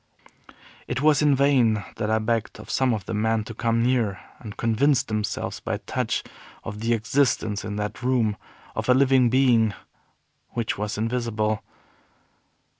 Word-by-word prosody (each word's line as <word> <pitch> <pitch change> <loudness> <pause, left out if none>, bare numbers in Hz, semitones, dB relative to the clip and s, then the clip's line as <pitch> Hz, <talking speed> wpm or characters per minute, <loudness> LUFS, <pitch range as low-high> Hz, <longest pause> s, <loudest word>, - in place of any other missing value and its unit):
It 130 +3 -2
was 150 -2 +4
in 145 -2 +4
vain 125 -7 +3
that 105 - -2
I 110 - +3
begged 110 0 -2
of - - -8
some 130 -1 +2
of 110 -4 -2
the - - -4
men 110 +1 +1
to 115 - -8
come 115 +1 0
near 120 -6 +1 0.2
and 105 -3 -9
convince 130 +4 +2
themselves 105 -4 -3
by - - -3
touch - - -2 0.4
of 105 - -6
the 115 +2 +1
existence 115 -3 0
in 105 -1 -4
that 105 +3 -4
room 120 -4 +1 0.4
of - - -3
a 125 - +6
living 130 -2 +4
being 120 -4 +3 0.8
which 115 -2 -1
was 105 +1 -3
invisible. 110 -2 -1
115 Hz, 155 wpm, -24 LUFS, 110-130 Hz, 0.8 s, a